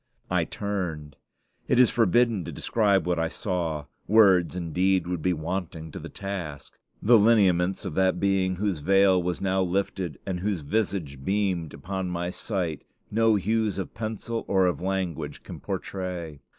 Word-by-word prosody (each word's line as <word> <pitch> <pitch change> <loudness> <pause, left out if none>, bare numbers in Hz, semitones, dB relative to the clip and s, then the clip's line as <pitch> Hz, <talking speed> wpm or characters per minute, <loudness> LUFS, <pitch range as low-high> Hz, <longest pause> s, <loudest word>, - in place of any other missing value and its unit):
I 90 -2 +2
turned. 85 -9 -4 0.5
It 125 - +3
is 125 - +6
forbidden 115 -2 +3
to - - -5
describe 100 -6 +1
what 90 -1 0
I 80 - +1
saw: 80 -5 -3 0.2
words, 95 -5 +5
indeed, 90 +1 +1
would 90 -2 -3
be 90 - +1
wanting 80 -1 -4
to - - -7
the - - -8
task. 85 -8 -6 0.3
The 115 +1 +7
lineaments 95 -4 +3
of - - -4
that 95 +2 +2
Being 95 -1 +1
whose 100 -3 -1
veil 95 +3 +4
was 90 0 -2
now 95 0 +1
lifted 95 -3 -1
and 95 -2 -2
whose 95 -2 -1
visage 75 -5 -2
beamed 95 -4 -1
upon 95 +5 -4
my 90 0 -2
sight, 90 -7 -3 0.3
no 115 0 +4
hues 110 +1 0
of 95 - -4
pencil 115 +1 -4
or 95 -1 +3
of 90 -1 0
language 95 -3 -3
can - - -9
portray. 90 -6 -5
95 Hz, 160 wpm, -26 LUFS, 85-100 Hz, 0.5 s, The